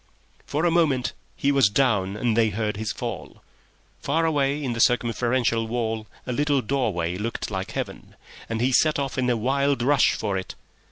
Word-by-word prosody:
For 155 +4 0
a 175 - +3
moment 145 -8 +2 0.2
he 140 - +1
was 135 -7 +4
down 105 -5 +1
and 115 0 0
they 115 -1 +3
heard 105 +1 -2
his 105 0 -3
fall. - - -6 0.6
Far 160 +4 0
away 145 -2 +1
in 125 -3 -1
the 115 - -5
circumferential 120 -1 +2
wall 110 -2 -2 0.2
a 125 - -3
little 145 0 +1
doorway 100 -10 -1
looked 115 0 -4
like 95 -1 -4
Heaven, - - -6 0.3
and 115 0 -2
he 130 +2 +2
set 155 +4 +3
off 135 -2 -2
in 125 -1 +1
a 120 - +2
wild 135 +2 +1
rush 140 +2 +4
for 100 -3 -2
it. 95 - -8
120 Hz, 180 wpm, -24 LUFS, 110-140 Hz, 0.6 s, was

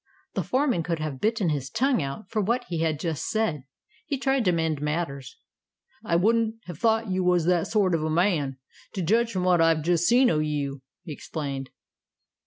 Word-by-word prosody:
The - - -1
foreman 255 - +1
could 165 0 -2
have 155 -4 -5
bitten 220 -5 +1
his 140 -3 -2
tongue 255 - +1
out 140 +9 -5
for 220 -2 -1
what 235 +5 0
he 170 -2 -2
had 160 -2 0
just 160 -2 -3
said. 215 - -1 0.4
He 280 - -1
tried 270 -2 +1
to 180 - +4
mend 160 -3 -1
matters. 150 -3 -3 0.7
"I 170 - 0
wouldn't 220 +4 +2
have 175 -4 -8
thought 225 -2 +1
you 185 0 0
was 180 -2 +2
that 175 -1 +2
sort 200 -5 +2
of 160 -2 0
a 155 - -1
man, 155 -5 +1 0.4
to 190 - -2
judge 230 +7 +2
from 185 -3 -2
what 180 -2 +4
I've 165 -2 +3
just 175 0 +2
seen 245 +2 +5
o' 155 - +1
you," 145 -3 -2 0.2
he 155 - -6
explained. 140 -3 -5
175 Hz, 195 wpm, -26 LUFS, 155-220 Hz, 0.7 s, seen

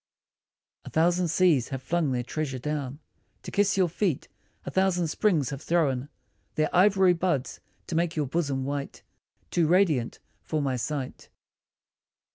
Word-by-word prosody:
A - - -9
thousand 175 +2 +2
seas 160 -6 +3
have 135 - -4
flung 165 -3 0
their 125 -1 -1
treasure 140 0 -3
down 145 0 -3 0.5
To - - -7
kiss 200 -1 +2
your 185 -2 +4
feet, 175 -2 -1 0.4
a - - -4
thousand 185 -3 +1
springs 165 - +1
have 140 0 -5
thrown 145 -6 0 0.5
Their 155 +2 0
ivory 190 0 +5
buds 165 -6 -1 0.3
to - - -6
make 170 0 0
your 150 -2 0
bosom 140 -2 -1
white 140 0 -4 0.5
Too 170 -3 +2
radiant 165 -9 +2 0.2
for 155 - -2
my 135 -3 0
sight. 130 +2 -4
155 Hz, 145 wpm, -27 LUFS, 135-175 Hz, 0.5 s, ivory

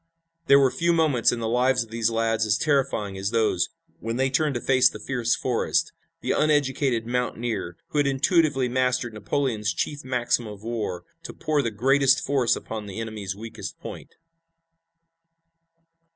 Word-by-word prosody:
There 140 - +8
were 135 -2 +4
few 170 0 +1
moments 155 -8 +3
in 120 - -3
the 115 - -1
lives 125 +2 +2
of 115 - -17
these 115 0 +1
lads 115 -1 0
as 100 - +3
terrifying 135 -9 0
as 100 +1 -1
those 110 -5 +1 0.3
when 115 0 -3
they 130 +1 +1
turned 150 -1 +1
to - - 0
face 130 -1 +4
the - - -9
fierce 120 -3 0
Forrest, 125 -3 0 0.3
the - - -1
uneducated 135 -5 +1
mountaineer 115 -7 -2
who 150 - -1
had 145 - +3
intuitively 140 -1 +2
mastered 125 -1 0
Napoleon's 110 0 -1
chief 145 -1 -3
maxim 125 -2 0
of 105 -1 -10
war, 110 -6 -3 0.2
to - - -8
pour 150 -2 0
the 120 - -1
greatest 135 +5 +3
force 135 -4 +2
upon 110 -2 -6
the 100 +2 -6
enemy's 105 -4 -5
weakest 115 +2 -8
point. - - -9
120 Hz, 165 wpm, -25 LUFS, 110-135 Hz, 0.3 s, There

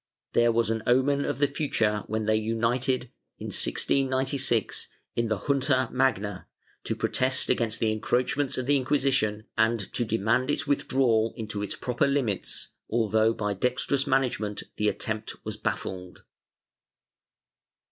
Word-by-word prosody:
There 120 0 +4
was 115 -1 +1
an 110 0 -1
omen 140 +3 +3
of - - -2
the 145 - +3
future 115 -8 0
when 110 0 -2
they 110 0 +3
united, 120 +3 0 0.3
in - - -6
1696, 130 -3 +1 0.3
in 115 0 +1
the 110 -1 0
Junta 130 +3 +1
Magna, 115 -6 0 0.4
to - - -1
protest 130 +1 +1
against 115 -1 0
the 110 -2 +2
encroachments 125 +5 0
of 130 - -2
the 145 +2 +3
Inquisition 130 -6 +1
and 110 -3 +1
to 120 - +1
demand 115 +3 +1
its 145 - 0
with 145 - 0
drawal 115 -4 +2
into 105 -2 -5
its 105 - -4
proper 125 +3 0
limits, 135 -8 -1 0.2
although 110 -1 +2
by 105 -2 -2
dextrous 125 +6 0
management 120 -6 0
the 105 0 +2
attempt 110 0 -3
was - - -4
baffled. 90 -1 -4
120 Hz, 140 wpm, -27 LUFS, 110-130 Hz, 0.4 s, There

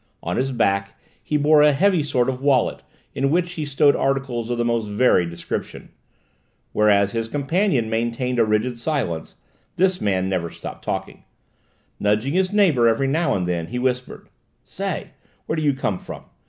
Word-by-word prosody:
On 90 - -2
his 135 +1 0
back 100 -5 0 0.2
he 150 - -1
bore 150 +1 +5
a 150 0 +5
heavy 185 +3 +3
sort 130 -4 0
of 130 -1 -2
wallet 135 -4 +2 0.3
in 135 +1 0
which 175 +3 +1
he 160 -4 -4
stowed 145 0 +3
articles 135 -4 -1
of 120 - -1
the 120 - 0
most 115 -2 0
varied 105 -5 +2
description. 85 - -6 0.8
Whereas 100 -2 +3
his 115 0 -2
companion 145 - 0
maintained 120 +2 -1
a - - +6
rigid 110 +3 0
silence, 115 - -3 0.4
this 185 0 +1
man 95 -2 0
never 90 -3 -2
stopped - - -9
talking. - - -5 0.7
Nudging 105 +7 +1
his 185 +1 +1
neighbour 170 - +4
every 115 +4 +2
now 145 +1 +1
and 90 -2 -1
then 85 -2 -2
he 125 - -5
whispered: 125 0 -2 0.4
"Say, - - -5 0.3
where - - -2
do 155 - -2
you 145 -2 +2
come 105 -8 -2
from? - - -9
125 Hz, 170 wpm, -22 LUFS, 105-145 Hz, 0.8 s, a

